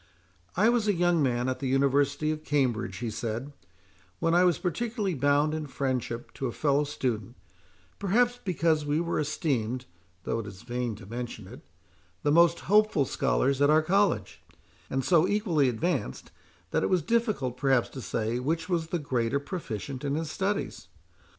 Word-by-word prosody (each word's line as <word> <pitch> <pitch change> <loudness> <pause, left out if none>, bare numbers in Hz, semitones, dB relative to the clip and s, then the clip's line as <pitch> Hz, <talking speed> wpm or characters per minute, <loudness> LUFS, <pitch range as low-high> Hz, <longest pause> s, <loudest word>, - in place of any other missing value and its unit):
"I 210 +4 +5
was 235 -3 +2
a 205 - +3
young 175 -1 +2
man 125 -2 +1
at 130 - -2
the 135 - -2
University 140 +3 +2
of 155 0 -5
Cambridge," 125 -6 0
he 120 -2 -3
said, 115 +5 -4 0.6
"when 165 - +1
I 175 +1 +5
was 175 -2 +3
particularly 210 +2 -2
bound 145 +1 +2
in 155 -1 -3
friendship 130 -3 -3
to 135 - -3
a - - -3
fellow 145 +3 +1
student, 120 -5 -3 0.6
perhaps 240 +5 +2
because 165 -4 +1
we 145 +1 0
were 170 0 -1
esteemed 130 -5 -1 0.4
(though 115 - -1
it 110 - -6
is 95 -1 -10
vain 120 -2 -3
to 105 -1 -12
mention 115 -1 -6
it) - - -11 0.6
the 145 - +2
most 170 +1 +5
hopeful 210 -8 +3
scholars 135 +2 +1
at 145 - +5
our 155 +1 +5
college; 195 +2 +1 0.5
and 135 -1 -1
so 175 +1 +4
equally 185 - +2
advanced, 165 +10 -2 0.4
that - - +1
it - - 0
was 180 -4 +2
difficult, 215 - 0
perhaps, 135 -2 +2
to 130 - -8
say 115 +2 -2
which 160 +5 -1
was 170 -3 0
the 175 - -1
greater 130 -4 0
proficient 140 - -5
in 140 0 -1
his 160 0 -3
studies. 195 - -2
145 Hz, 170 wpm, -28 LUFS, 125-170 Hz, 0.6 s, I